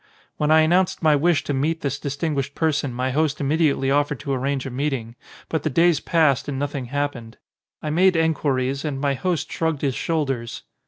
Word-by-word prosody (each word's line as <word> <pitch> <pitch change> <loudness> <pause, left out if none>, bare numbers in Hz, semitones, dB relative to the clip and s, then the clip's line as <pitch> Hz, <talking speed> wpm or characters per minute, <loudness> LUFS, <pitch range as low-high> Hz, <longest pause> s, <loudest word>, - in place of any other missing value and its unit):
When 150 - 0
I 160 0 +6
announced 180 +3 +2
my 155 -2 +5
wish 160 +2 +2
to 145 - -2
meet 155 +5 -1
this 145 0 -2
dis 140 -1 -4
tinguished 140 -3 -2
person 145 -4 0
my 130 +2 -2
host 155 +1 0
immediately 140 -2 +1
offered 145 0 +1
to 140 -1 -2
arrange 135 +1 -1
a 135 - -5
meeting; 130 -4 -3 0.3
but 160 - -1
the 155 - -1
days 165 +1 +3
passed 155 -7 +2
and 140 -2 -3
nothing 140 -1 -3
happened. 130 -4 -4 0.5
I 155 - -2
made 185 +3 +4
enquiries 140 -4 0
and 145 -4 -3
my 140 0 +1
host 175 +4 -2
shrugged 160 -3 -1
his 135 -2 +1
shoulders. 135 -7 -2
145 Hz, 195 wpm, -23 LUFS, 135-160 Hz, 0.5 s, I